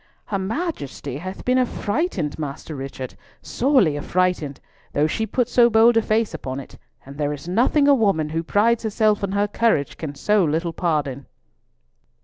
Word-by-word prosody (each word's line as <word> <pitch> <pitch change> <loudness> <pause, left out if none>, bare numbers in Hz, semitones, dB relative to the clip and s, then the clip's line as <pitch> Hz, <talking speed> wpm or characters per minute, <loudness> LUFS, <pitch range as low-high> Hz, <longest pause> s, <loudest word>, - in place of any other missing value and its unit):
"Her 195 - -2
Majesty 190 - -4
hath 185 +5 -7
been 255 +1 +3
affrighted, 205 - -1
Master 150 +1 -5
Richard, 135 -1 -6 0.3
sorely 245 - +2
affrighted, 165 -2 -1 0.3
though 145 - +2
she 220 +8 -1
put 240 +3 0
so 240 -1 +5
bold 225 +1 +5
a 225 - +5
face 215 -2 0
upon 135 -4 -5
it, 135 - -11 0.3
and 140 +2 -11
there 145 0 0
is 145 +3 -9
nothing 250 - +3
a 285 - +7
woman, 195 - +2
who 165 +1 -1
prides 220 +7 +2
herself 215 -1 +1
on 195 -1 -1
her 205 +1 +1
courage, 205 -9 +1
can 145 -3 -6
so 210 +6 +2
little 165 +2 -1
pardon." 145 -7 -2
185 Hz, 165 wpm, -22 LUFS, 150-225 Hz, 0.3 s, a